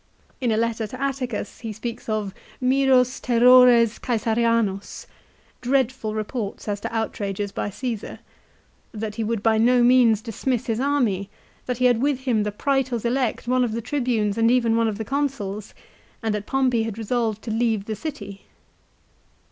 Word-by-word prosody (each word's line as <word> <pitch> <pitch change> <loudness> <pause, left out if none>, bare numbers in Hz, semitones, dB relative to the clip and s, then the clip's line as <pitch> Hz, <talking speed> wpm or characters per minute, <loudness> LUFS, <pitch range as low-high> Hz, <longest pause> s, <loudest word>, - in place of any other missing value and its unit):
In 250 -4 0
a 215 - +1
letter 230 -1 -1
to 255 +4 -9
Atticus 265 -6 -3
he 225 -2 -5
speaks 225 +2 -6
of 210 -3 -2
" - - -24
Miros 260 -2 +3
terrores 245 -1 +6
Csesarianos," 230 -4 0
l - - -31 0.5
"dreadful 255 -4 0
reports 215 -1 -4
as 205 -1 -2
to - - -5
outrages 205 -3 -3
by - - -3
Caesar," 230 +1 -5 0.8
that 215 0 -4
he 225 - -1
would 220 -1 -2
by 220 -1 +3
no 245 +2 +4
means 240 -3 +4
dismiss 240 +1 -2
his 225 -1 -1
army, 245 -9 0 0.4
that 250 -2 -2
he 255 - +1
had 245 -2 +3
with 280 -1 0
him 245 -5 +1
the 210 0 -1
Praetors 260 0 -1
elect, 245 -1 -1
one 255 0 +2
of 235 -3 -1
the 230 - -2
Tribunes, 230 -5 -1
and 230 0 +4
even 235 -2 +3
one 230 0 +2
of 210 -2 -2
the 220 - -4
Consuls; 240 -8 -3 0.5
and 220 -1 0
that 210 0 -4
Pompey 260 -4 +1
had 225 -2 -4
resolved 225 -1 -1
to 230 - -4
leave 225 -2 0
the 220 - -3
city. 205 -7 -7
230 Hz, 170 wpm, -23 LUFS, 215-250 Hz, 0.8 s, terrores